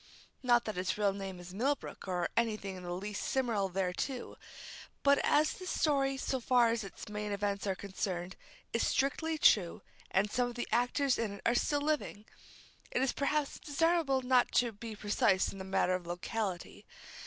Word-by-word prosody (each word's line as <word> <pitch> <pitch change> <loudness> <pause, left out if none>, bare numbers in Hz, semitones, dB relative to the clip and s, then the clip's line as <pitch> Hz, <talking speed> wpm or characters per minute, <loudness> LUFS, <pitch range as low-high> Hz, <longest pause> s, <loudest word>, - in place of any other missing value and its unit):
Not 240 -2 +3
that 215 -4 -3
its 185 +2 -1
real 205 -2 +2
name 195 -2 -6
is 175 +1 -10
Millbrook, 265 +1 -2
or 180 -2 0
any 230 -2 +2
thing 195 -2 -6
in 185 - -8
the 175 0 -6
least 200 +3 -4
similar 230 -7 0
thereto; 190 +8 -2 0.7
but 280 0 +5
as 300 +1 +3
this 370 -1 -7
story, 275 -3 +1
so 265 0 -1
far 245 -1 +4
as 230 -1 -1
its 195 - -9
main 210 0 -4
events 200 0 -1
are 190 - 0
concerned, 185 -2 -4 0.4
is 230 - +2
strictly 315 +4 0
true, 190 - +4 0.3
and 200 +2 +1
some 250 -1 +1
of 240 - -9
the 240 - -3
actors 250 +3 +2
in 220 -3 -1
it 200 - -10
are 235 - +4
still 290 +4 +1
living, 290 -8 -1 0.6
it 255 - 0
is 265 - +1
perhaps 285 0 -1
desirable 300 -3 +1
not 250 -1 +3
to 240 -1 +3
be 220 +1 -8
too - - -17
precise 205 -2 +2
in 195 - -10
the - - -5
matter 190 -1 +1
of 180 -2 -3
locality. 180 +1 -4
220 Hz, 190 wpm, -32 LUFS, 195-265 Hz, 0.7 s, but